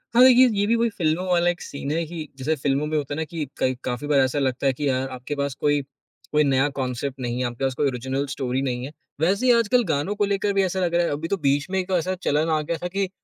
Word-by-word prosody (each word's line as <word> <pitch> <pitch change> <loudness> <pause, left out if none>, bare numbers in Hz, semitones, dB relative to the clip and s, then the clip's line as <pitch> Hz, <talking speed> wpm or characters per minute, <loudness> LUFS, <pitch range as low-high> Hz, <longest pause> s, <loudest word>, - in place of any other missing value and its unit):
हाँ, 245 - +8
ये 255 0 +8
ये 205 - +3
भी 230 - +3
कोई 235 0 +2
फ़िल्मों 175 -3 -1
वाला 175 -1 +3
एक 175 0 -3
सीन 140 0 -5
है 165 +2 0
कि 160 -2 -6
जैसे 145 +4 0
फ़िल्मों 140 0 0
में 155 0 -1
होता 145 -1 -3
है - - -3
ना - - 0
कि 160 -1 -4
कई 130 - +1
काफ़ी 125 +4 -3
बार 145 -2 +3
ऐसा 130 +2 +2
लगता 135 0 0
है 135 - +3
कि 145 +3 -2
अ, 135 - +2 0.2
आपके 130 +3 -5
पास 140 -1 -2
कोई 145 -1 +2 0.5
कोई 150 0 +4
नया 135 0 +3
कॉन्सेप्ट 130 +1 -3
नहीं 120 -1 -3
है, - - 0
आपके 120 +2 -6
पास 135 -1 +1
कोई 145 - +1
ओरिजिनल 130 +2 -2
स्टोरी 130 -2 -2
नहीं 125 -2 -2
है। 140 - -7 0.3
वैसे 195 +9 +2
ही 250 - +6
आजकल 235 +2 +3
गानों 150 +8 0
को 205 0 +1
लेकर 200 0 0
भी 195 0 +3
ऐसा 190 0 -1
लग 175 -2 0
रहा 175 0 +3
है - - -1
अभी 150 +3 -3
तो 200 - -1
बीच 140 +4 +1
में 190 - +1
एक 185 +1 -4
ऐसा 185 +3 -1
चलन 150 +3 +1
आ 155 -1 +2
गया 165 +2 -3
था - - 0
कि 195 +1 -2
150 Hz, 285 wpm, -24 LUFS, 135-180 Hz, 0.5 s, हाँ